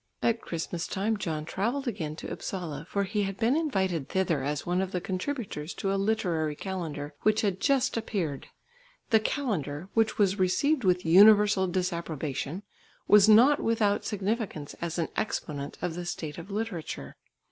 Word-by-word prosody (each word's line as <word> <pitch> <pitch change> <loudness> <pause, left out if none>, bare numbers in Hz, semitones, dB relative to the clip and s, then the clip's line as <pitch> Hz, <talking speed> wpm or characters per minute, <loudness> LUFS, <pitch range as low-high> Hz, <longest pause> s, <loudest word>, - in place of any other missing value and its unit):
At 230 0 +2
Christmas 170 0 -4
time 210 +3 0
John 160 -6 -3
travelled 240 - -2
again 160 -9 -3
to - - -7
Upsala, 165 -5 -5
for 200 - 0
he 205 +2 -1
had 195 -1 -2
been 230 +7 +2
invited 190 - 0
thither 185 -6 +1
as 145 +1 -2
one 180 +1 +1
of 190 -1 -3
the 180 - 0
contributors 185 - -4
to 195 -2 -1
a - - +1
Literary 185 -7 0
Calendar 155 -6 -5
which 215 0 +3
had 195 -3 0
just 270 +2 +2
appeared. 190 - -3 0.6
The 220 - +6
Calendar, 190 - -2
which 225 -1 +2
was 200 -1 +2
received 260 +10 +2
with 180 -2 +2
universal 200 +2 +6
disapprobation, 170 -2 -3 0.4
was 210 0 +7
not 250 +7 +7
without 215 -3 +1
significance 205 -7 -3
as 170 0 -3
an 165 - -1
exponent 145 -8 -3
of 180 - -1
the 175 +1 -5
state 155 -2 -5
of 170 +4 -10
literature. 195 - -4
190 Hz, 160 wpm, -28 LUFS, 165-215 Hz, 0.6 s, was